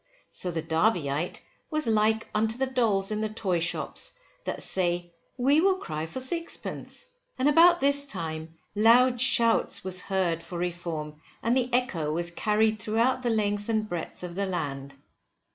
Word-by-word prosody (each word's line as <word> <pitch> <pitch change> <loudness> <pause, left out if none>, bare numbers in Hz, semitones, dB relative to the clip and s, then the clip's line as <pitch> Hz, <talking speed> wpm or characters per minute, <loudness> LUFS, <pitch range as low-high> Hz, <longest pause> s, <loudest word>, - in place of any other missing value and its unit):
So 180 - -3
the 165 -2 -3
Derbyite 160 -2 -1 0.3
was 310 -2 0
like 220 0 +1
unto 220 +2 0
the 265 - 0
dolls 225 -7 +1
in 215 0 -2
the 215 - -1
toy 195 -5 -1
shops, 170 +1 +3 0.3
that - - -4
say, 175 -2 +2 0.2
we 275 +5 +3
will 385 +1 +3
cry 155 - -5
for 210 - -6
sixpence. 335 - -3 0.3
And 260 - +1
about 340 +3 +5
this 280 +1 +4
time, 160 - -5 0.2
loud 235 +3 +4
shouts 230 -3 +3
was 185 -1 -3
heard 185 -5 -1
for 175 - -8
Reform, 170 -3 -5 0.2
and 235 +2 +1
the 255 -1 0
echo 190 -12 0
was 170 +2 -1
carried 215 +3 +1
throughout 230 +4 0
the 245 - -1
length 205 -1 -1
and 215 -1 0
breadth 175 -1 -6
of 175 -1 -6
the 200 +2 -2
land. 140 -6 -5
210 Hz, 160 wpm, -26 LUFS, 170-245 Hz, 0.3 s, about